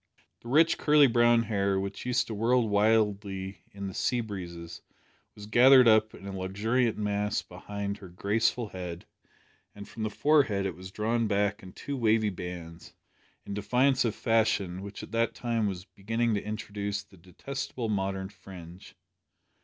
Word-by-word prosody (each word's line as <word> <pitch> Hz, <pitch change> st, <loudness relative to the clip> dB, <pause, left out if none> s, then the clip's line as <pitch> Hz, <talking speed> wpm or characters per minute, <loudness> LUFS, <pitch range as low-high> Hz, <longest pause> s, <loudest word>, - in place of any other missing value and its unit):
The -, -, -14 dB
rich 160 Hz, +6 st, +4 dB
curly 150 Hz, -1 st, +6 dB
brown 120 Hz, -1 st, +4 dB
hair, 100 Hz, -3 st, 0 dB
which 100 Hz, +4 st, -5 dB
used 125 Hz, 0 st, +1 dB
to 115 Hz, -, -6 dB
whirl 115 Hz, +2 st, +2 dB
wildly 100 Hz, -2 st, +1 dB
in 100 Hz, 0 st, -7 dB
the 95 Hz, -, -6 dB
sea 125 Hz, +6 st, 0 dB
breezes, 85 Hz, -6 st, -7 dB, 0.5 s
was 105 Hz, -, -10 dB
gathered 125 Hz, +3 st, +7 dB
up 110 Hz, -1 st, +4 dB
in -, -, -13 dB
a 100 Hz, -, -5 dB
luxuriant 110 Hz, +6 st, 0 dB
mass 105 Hz, 0 st, -1 dB
behind 100 Hz, +2 st, -6 dB
her 95 Hz, -, -10 dB
graceful 105 Hz, +5 st, 0 dB
head, 90 Hz, -2 st, -7 dB, 0.7 s
and 100 Hz, 0 st, -9 dB
from 115 Hz, -, -9 dB
the 110 Hz, -, -1 dB
forehead 135 Hz, -6 st, +2 dB
it 95 Hz, -, -2 dB
was 95 Hz, +1 st, -10 dB
drawn 110 Hz, +3 st, 0 dB
back 100 Hz, 0 st, 0 dB
in 95 Hz, -1 st, -12 dB
two 140 Hz, -, -5 dB
wavy 110 Hz, -3 st, +2 dB
bands, 85 Hz, -2 st, -8 dB, 0.5 s
in -, -, -6 dB
defiance 125 Hz, +6 st, +2 dB
of 115 Hz, -3 st, -1 dB
fashion, 105 Hz, -5 st, +1 dB
which 100 Hz, +1 st, -8 dB
at -, -, -10 dB
that 115 Hz, 0 st, 0 dB
time 115 Hz, -3 st, -1 dB
was 95 Hz, -2 st, -5 dB
beginning 115 Hz, +4 st, -1 dB
to 100 Hz, -, 0 dB
introduce 100 Hz, -1 st, -4 dB
the 100 Hz, -, -20 dB
detestable 120 Hz, +7 st, -6 dB
modern 95 Hz, -2 st, -2 dB
fringe. 90 Hz, -3 st, -12 dB
105 Hz, 160 wpm, -28 LUFS, 95-115 Hz, 0.7 s, gathered